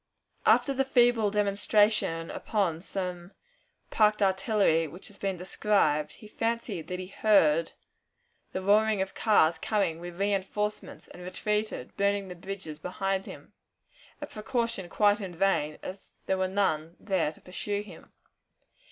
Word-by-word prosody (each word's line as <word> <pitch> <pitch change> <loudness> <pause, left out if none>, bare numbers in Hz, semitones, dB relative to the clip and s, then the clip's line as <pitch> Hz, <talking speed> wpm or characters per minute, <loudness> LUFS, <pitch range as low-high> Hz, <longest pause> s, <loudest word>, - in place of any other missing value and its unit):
After 275 - +5
the 270 0 +1
feeble 240 -5 +3
demonstration 205 -4 +1
upon 185 -7 -1
some 180 -1 -5 0.6
parked 210 -1 +3
artillery 190 -4 +2
which 175 +8 -10
has 205 - -16
been 195 -2 -2
described, 170 -5 +1
he 215 - -13
fancied 225 -6 -3
that 180 - -3
he 185 - -5
heard 170 -5 +3 0.8
the 185 - -4
roaring 210 +1 +4
of 190 - -9
cars 170 -7 +3
coming 190 -6 0
with 175 0 -8
reënforcements, 205 +1 -2
and 180 - -12
retreated, 210 -4 -3
burning 200 -1 +1
the 180 - -7
bridges 180 -4 -7
behind 195 +3 -2
him - - -11 0.7
a 295 - -4
precaution 230 -6 -3
quite 205 +2 +3
in 185 -3 -6
vain, 160 -5 +1
as 190 +1 -9
there 190 - 0
were 190 - +1
none 170 -4 0
there 190 -7 0
to - - -18
pursue 205 +3 -4
him. 185 -6 -14
195 Hz, 140 wpm, -28 LUFS, 175-210 Hz, 0.8 s, After